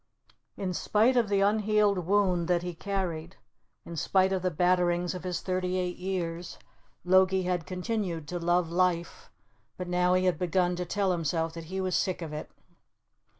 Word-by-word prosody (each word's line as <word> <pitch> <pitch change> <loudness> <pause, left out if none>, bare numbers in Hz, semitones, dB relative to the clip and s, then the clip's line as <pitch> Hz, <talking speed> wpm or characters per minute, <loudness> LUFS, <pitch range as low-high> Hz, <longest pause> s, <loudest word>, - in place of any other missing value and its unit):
In 185 -2 -2
spite 220 +8 +2
of 235 -4 +2
the 200 -1 +2
unhealed 205 -3 +2
wound 185 -4 +2
that 175 -1 +1
he 180 0 -4
carried, 175 -2 -3 0.5
in 170 - -7
spite 190 +4 +2
of 190 - -1
the 185 - +1
batterings 175 +1 +1
of 180 - -7
his 180 -2 -3
thirty 185 0 -1
eight 180 -1 -2
years, 175 -2 -4 0.5
Logie 185 +1 +4
had 180 -2 -2
continued 180 -4 -3
to 175 - -3
love 175 0 +1
life, 175 -1 0 0.5
but 180 - -5
now 180 0 +2
he 185 0 +2
had 180 -1 +1
begun 180 0 +1
to 180 - -2
tell 195 +2 0
himself 165 -1 -1
that 165 -1 -8
he 190 +4 -4
was 185 -1 -1
sick 185 -2 0
of 155 -2 -6
it. 150 - -6
180 Hz, 175 wpm, -28 LUFS, 175-190 Hz, 0.5 s, Logie